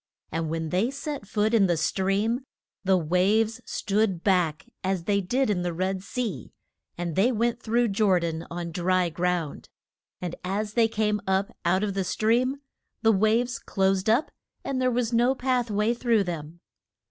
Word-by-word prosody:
And 165 Hz, -1 st, -2 dB
when 160 Hz, 0 st, -2 dB
they 190 Hz, +8 st, +1 dB
set 275 Hz, -4 st, -5 dB
foot 210 Hz, +2 st, 0 dB
in 205 Hz, -4 st, +5 dB
the 175 Hz, -2 st, +1 dB
stream 195 Hz, -, 0 dB, 0.4 s
the 190 Hz, -1 st, +4 dB
waves 200 Hz, +8 st, +2 dB
stood 200 Hz, -4 st, 0 dB
back 175 Hz, -6 st, +1 dB, 0.2 s
as 190 Hz, -2 st, -1 dB
they 200 Hz, +2 st, +1 dB
did 250 Hz, +9 st, +1 dB
in 200 Hz, -4 st, 0 dB
the 175 Hz, -1 st, -2 dB
Red 185 Hz, +2 st, -1 dB
Sea, 230 Hz, +1 st, -4 dB, 0.5 s
and 170 Hz, -2 st, -3 dB
they 225 Hz, +7 st, +4 dB
went 235 Hz, 0 st, 0 dB
through 235 Hz, +1 st, +1 dB
Jor 195 Hz, -2 st, +3 dB
dan 165 Hz, -1 st, -3 dB
on 170 Hz, 0 st, -5 dB
dry 180 Hz, +1 st, +1 dB
ground. 175 Hz, -2 st, -2 dB, 0.5 s
And 175 Hz, -2 st, -4 dB
as 205 Hz, +3 st, -2 dB
they 230 Hz, -1 st, +4 dB
came 210 Hz, -2 st, 0 dB
up 190 Hz, +1 st, 0 dB
out 185 Hz, +4 st, +2 dB
of 205 Hz, -2 st, -1 dB
the 195 Hz, 0 st, -1 dB
stream 240 Hz, +8 st, +1 dB, 0.5 s
the 225 Hz, -, +6 dB
waves 225 Hz, +5 st, +2 dB
closed 195 Hz, 0 st, 0 dB
up 240 Hz, +8 st, +2 dB, 0.3 s
and 260 Hz, -2 st, -2 dB
there 255 Hz, -, +3 dB
was 240 Hz, -1 st, 0 dB
no 240 Hz, +3 st, +3 dB
path 250 Hz, -2 st, 0 dB
way 210 Hz, +3 st, +1 dB
through 235 Hz, -3 st, +2 dB
them. 170 Hz, -1 st, -6 dB
200 Hz, 170 wpm, -26 LUFS, 180-230 Hz, 0.5 s, the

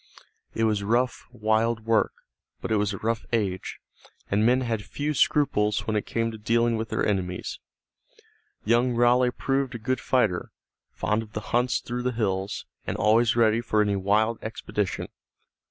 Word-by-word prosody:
It 115 Hz, -, 0 dB
was 105 Hz, -2 st, +2 dB
rough, 120 Hz, +5 st, 0 dB
wild 110 Hz, +1 st, 0 dB
work, 115 Hz, -1 st, +2 dB, 0.5 s
but -, -, -5 dB
it 110 Hz, -, +3 dB
was 105 Hz, 0 st, +1 dB
a 100 Hz, -, -4 dB
rough 115 Hz, +2 st, -1 dB
age, 100 Hz, -5 st, -1 dB, 0.5 s
and 100 Hz, +2 st, +3 dB
men 125 Hz, +3 st, +4 dB
had 115 Hz, -4 st, -1 dB
few 145 Hz, +8 st, -3 dB
scruples 105 Hz, -7 st, +2 dB
when 110 Hz, -, -1 dB
it 105 Hz, -, -1 dB
came 115 Hz, 0 st, -1 dB
to 110 Hz, -, -9 dB
dealing 115 Hz, +2 st, +2 dB
with 110 Hz, 0 st, -3 dB
their -, -, 0 dB
enemies. 90 Hz, -3 st, -2 dB, 1.1 s
Young 120 Hz, +3 st, +3 dB
Raleigh 120 Hz, +1 st, +4 dB
proved 135 Hz, 0 st, -1 dB
a -, -, -2 dB
good 125 Hz, +3 st, -1 dB
fighter, 110 Hz, -7 st, +1 dB, 0.4 s
fond 105 Hz, +2 st, -1 dB
of 110 Hz, -1 st, -11 dB
the -, -, -2 dB
hunts 120 Hz, +1 st, +2 dB
through 120 Hz, 0 st, -4 dB
the 125 Hz, 0 st, -1 dB
hills, 95 Hz, -3 st, -2 dB, 0.2 s
and -, -, -2 dB
always 115 Hz, +2 st, +3 dB
ready 115 Hz, -1 st, +3 dB
for 110 Hz, -2 st, 0 dB
any 105 Hz, -1 st, +2 dB
wild 105 Hz, +4 st, +1 dB
expedition. 105 Hz, -3 st, -3 dB
110 Hz, 170 wpm, -26 LUFS, 105-120 Hz, 1.1 s, men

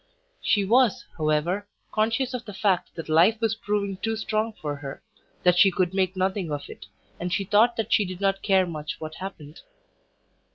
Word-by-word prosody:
She 205 Hz, -2 st, +2 dB
was, 240 Hz, +1 st, +3 dB
however, 160 Hz, +6 st, 0 dB, 0.2 s
conscious 230 Hz, +4 st, 0 dB
of 250 Hz, -1 st, -4 dB
the 205 Hz, -, -8 dB
fact 195 Hz, -3 st, 0 dB
that 165 Hz, -, -6 dB
life 170 Hz, +8 st, +4 dB
was 225 Hz, -2 st, +1 dB
proving 205 Hz, -3 st, -2 dB
too 225 Hz, +3 st, -2 dB
strong 220 Hz, 0 st, -1 dB
for 150 Hz, -7 st, -5 dB
her, 140 Hz, -1 st, -8 dB, 0.4 s
that 180 Hz, 0 st, +4 dB
she 195 Hz, -, +8 dB
could 185 Hz, -1 st, 0 dB
make 190 Hz, -1 st, +1 dB
nothing 190 Hz, -2 st, -1 dB
of 145 Hz, -1 st, -4 dB
it, -, -, -12 dB, 0.3 s
and 180 Hz, +1 st, -3 dB
she 195 Hz, -, 0 dB
thought 215 Hz, +5 st, +4 dB
that 225 Hz, -1 st, -1 dB
she 210 Hz, -, +4 dB
did 185 Hz, -2 st, -6 dB
not 195 Hz, -1 st, +1 dB
care 190 Hz, -2 st, +3 dB
much 155 Hz, -3 st, -6 dB
what 155 Hz, 0 st, -6 dB
happened. 165 Hz, -5 st, -8 dB
195 Hz, 190 wpm, -25 LUFS, 175-215 Hz, 0.4 s, she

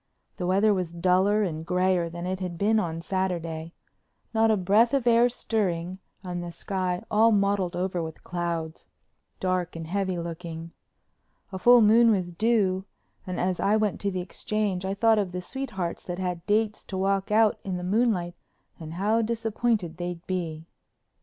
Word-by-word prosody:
The 180 Hz, -, -2 dB
weather 200 Hz, +3 st, +4 dB
was 180 Hz, -3 st, -2 dB
duller 185 Hz, +4 st, +3 dB
and 160 Hz, -4 st, -3 dB
grayer 180 Hz, 0 st, +1 dB
than 170 Hz, +1 st, -6 dB
it 185 Hz, +1 st, -2 dB
had 180 Hz, -2 st, -4 dB
been 215 Hz, +4 st, +3 dB
on 165 Hz, -4 st, -3 dB
Saturday, 170 Hz, -4 st, -3 dB, 0.6 s
not 225 Hz, 0 st, +3 dB
a 215 Hz, -, +3 dB
breath 210 Hz, +7 st, +3 dB
of 265 Hz, -3 st, 0 dB
air 240 Hz, +1 st, +5 dB
stirring 185 Hz, -7 st, -2 dB, 0.2 s
and 175 Hz, -1 st, -4 dB
the 175 Hz, -, -6 dB
sky 180 Hz, +2 st, -3 dB
all 225 Hz, +2 st, +5 dB
mottled 200 Hz, -3 st, +1 dB
over 180 Hz, 0 st, -1 dB
with 160 Hz, -1 st, -7 dB
clouds, 170 Hz, -2 st, -4 dB, 0.5 s
dark 185 Hz, -2 st, -1 dB
and 165 Hz, -1 st, -5 dB
heavy 190 Hz, +1 st, -1 dB
looking. 165 Hz, -1 st, -6 dB, 0.8 s
A 190 Hz, -, -5 dB
full 245 Hz, +4 st, +7 dB
moon 230 Hz, +2 st, +6 dB
was 185 Hz, -5 st, +1 dB
due 195 Hz, -1 st, +1 dB, 0.4 s
and 180 Hz, -, -3 dB
as 185 Hz, 0 st, 0 dB
I 210 Hz, +2 st, +3 dB
went 215 Hz, -2 st, -1 dB
to 200 Hz, -, 0 dB
the 185 Hz, -2 st, -3 dB
Exchange 195 Hz, 0 st, -2 dB
I 195 Hz, +1 st, -2 dB
thought 225 Hz, +1 st, +4 dB
of 190 Hz, -3 st, -2 dB
the 180 Hz, -, -2 dB
sweethearts 190 Hz, -4 st, -4 dB
that 175 Hz, -1 st, -4 dB
had 180 Hz, -2 st, -3 dB
dates 215 Hz, 0 st, +1 dB
to 190 Hz, -, -5 dB
walk 195 Hz, 0 st, 0 dB
out 215 Hz, 0 st, +3 dB
in 185 Hz, -2 st, -3 dB
the 180 Hz, -, -5 dB
moonlight 190 Hz, -3 st, +1 dB, 0.5 s
and 160 Hz, -1 st, -7 dB
how 210 Hz, +5 st, +2 dB
disappointed 225 Hz, -5 st, -1 dB
they'd 175 Hz, -1 st, -5 dB
be. 165 Hz, -4 st, -3 dB
185 Hz, 170 wpm, -26 LUFS, 175-210 Hz, 0.8 s, full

